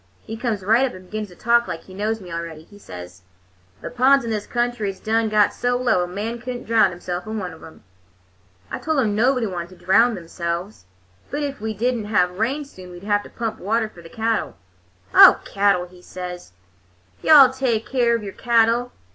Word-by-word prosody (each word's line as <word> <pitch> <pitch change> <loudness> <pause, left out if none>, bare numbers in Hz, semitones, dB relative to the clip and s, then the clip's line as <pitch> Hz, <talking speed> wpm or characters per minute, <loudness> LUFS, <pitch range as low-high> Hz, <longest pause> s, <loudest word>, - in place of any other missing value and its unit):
He 225 - -6
comes 225 -4 -3
right 225 +6 +4
up 260 -7 -1
and 185 0 -12
begins 215 +3 -5
to 180 - -16
talk 235 +4 +2
like 165 - -5
he 190 - -14
knows 215 +3 -2
me 180 -4 -10
already. 165 -2 -6
He 205 +4 -17
says: 90 - -10 0.6
'The - - -6
ponds 260 +1 +4
in 230 - -3
this 210 -1 -3
country 240 -3 -1
is 190 -1 -7
done 225 0 0
got 210 -1 +3
so 245 0 0
low 240 -8 +2
a - - -4
man 215 +6 -4
could 250 0 -5
n't 245 - -8
drownd 220 -3 +4
himself 175 +2 -6
in 220 0 -4
one 180 -4 -5
of 160 - -15
'em.' 160 - -14 0.9
"I - - -4
told 315 -1 -1
him 220 -5 +1
nobody 250 +2 +2
wanted 180 -2 -6
to - - -20
drownd 230 +4 +4
themselves, 170 - -5 0.4
but 290 +1 -3
if 280 -3 -4
we 220 0 -3
did 245 +5 +1
n't 210 -2 -5
have 180 -3 +1
rain 270 +7 -1
soon 185 -9 -13
we'd 175 +1 -11
have 205 0 +1
to - - -13
pump 225 -2 -4
water 220 +3 0
for 180 -5 -15
the 165 - -13
cattle. 225 - -2 0.6
"'Oh, - - +9
cattle,' 200 -3 +1
he 180 0 -17
says, 180 - -8 0.7
'you'll 310 - +6
all 270 -3 +9
take 245 -4 -1
care 240 -3 +2
of 230 - -4
your 200 -2 -7
cattle! 235 0 +2
215 Hz, 220 wpm, -22 LUFS, 180-235 Hz, 0.9 s, Oh